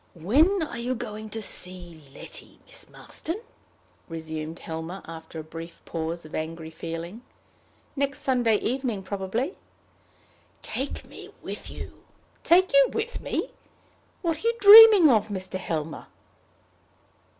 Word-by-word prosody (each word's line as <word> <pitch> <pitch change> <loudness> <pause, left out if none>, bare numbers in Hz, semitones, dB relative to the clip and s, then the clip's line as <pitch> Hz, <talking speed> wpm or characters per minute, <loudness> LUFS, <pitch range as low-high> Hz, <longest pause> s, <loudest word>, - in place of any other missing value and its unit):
"When 300 - +3
are 240 -6 -5
you 250 +2 -1
going 215 -1 -6
to 220 +1 -5
see 180 -4 -3
Letty, - - -8
Miss - - -7
Marston?" 335 +6 -6 0.7
resumed 160 0 -5
Helmer, 165 +4 -6
after 160 0 -9
a - - -6
brief 165 +2 -9
pause 165 0 -4
of 155 - -13
angry 160 0 -5
feeling. 165 +7 -6 0.7
"Next 280 0 -1
Sunday 245 -4 +2
evening 240 -2 -2
probably." 200 - -3 1.0
"Take 270 +2 -4
me - - -12
with - - -6
you." - - -9 0.4
"Take 365 +1 +5
you 275 -1 +6
with 450 +2 -3
me! - - -3 0.7
What 330 -2 0
are 440 - -2
you 465 - +2
dreaming 415 -3 +11
of, 220 -7 +4
Mr. 185 -2 -4
Helmer?" 155 -3 -4
205 Hz, 130 wpm, -26 LUFS, 165-275 Hz, 1.0 s, dreaming